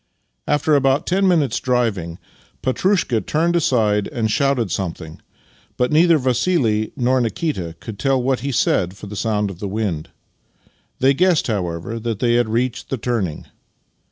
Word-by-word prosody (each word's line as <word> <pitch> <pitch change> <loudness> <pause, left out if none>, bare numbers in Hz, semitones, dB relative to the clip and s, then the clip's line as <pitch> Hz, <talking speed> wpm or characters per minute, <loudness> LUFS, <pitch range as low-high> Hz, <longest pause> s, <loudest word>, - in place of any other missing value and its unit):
After 150 +1 +2
about 135 +1 +2
ten 190 +2 +2
minutes' 150 -10 +2
driving, 110 -10 -1 0.5
Petrushka 130 - +1
turned 165 - 0
aside 110 -10 +2
and 110 -2 -2
shouted 130 - +1
something, 85 -4 -5 0.6
but 125 0 +1
neither 165 +2 +5
Vassih 125 -4 +1
nor 130 +1 +2
Nikita 115 - -2
could 105 -3 -9
tell 135 -1 +2
what 130 +1 0
he 140 - -3
said 95 -6 +1
for - - -10
the 105 +1 -8
sound 105 -1 -1
of 90 - -11
the 100 - -4
wind. 95 -6 -3 0.9
They 135 +2 +4
guessed, 180 +2 +2
however, 95 0 -3
that 115 -1 -3
they 120 +2 +1
had 120 -2 +2
reached 120 +2 -1
the 135 - -2
turning. 110 -9 -2
120 Hz, 155 wpm, -20 LUFS, 105-140 Hz, 0.9 s, neither